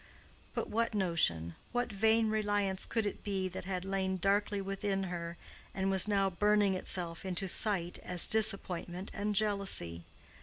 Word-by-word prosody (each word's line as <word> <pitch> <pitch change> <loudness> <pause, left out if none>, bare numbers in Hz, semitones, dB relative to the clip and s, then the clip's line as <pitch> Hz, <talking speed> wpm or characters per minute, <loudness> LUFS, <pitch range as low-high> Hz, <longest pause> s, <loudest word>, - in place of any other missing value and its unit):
But - - -2
what 230 0 -1
notion, 85 - +1 0.2
what 245 -1 -1
vain 220 +2 +2
reliance 205 -3 0
could 225 -2 -1
it 205 - -5
be 195 -2 -1
that 180 - -7
had 185 -1 -3
lain 190 -1 -1
darkly 200 +2 +1
within 195 0 -2
her 170 0 -6 0.4
and 195 0 0
was 190 +1 +5
now 200 -2 +2
burning 205 +1 +2
itself 175 -2 -2
into 190 0 -2
sight 180 -3 +3
as 180 -1 +2
disappointment 195 -4 +1
and 205 +1 -2
jealousy? 195 - +1
195 Hz, 150 wpm, -32 LUFS, 180-205 Hz, 0.4 s, was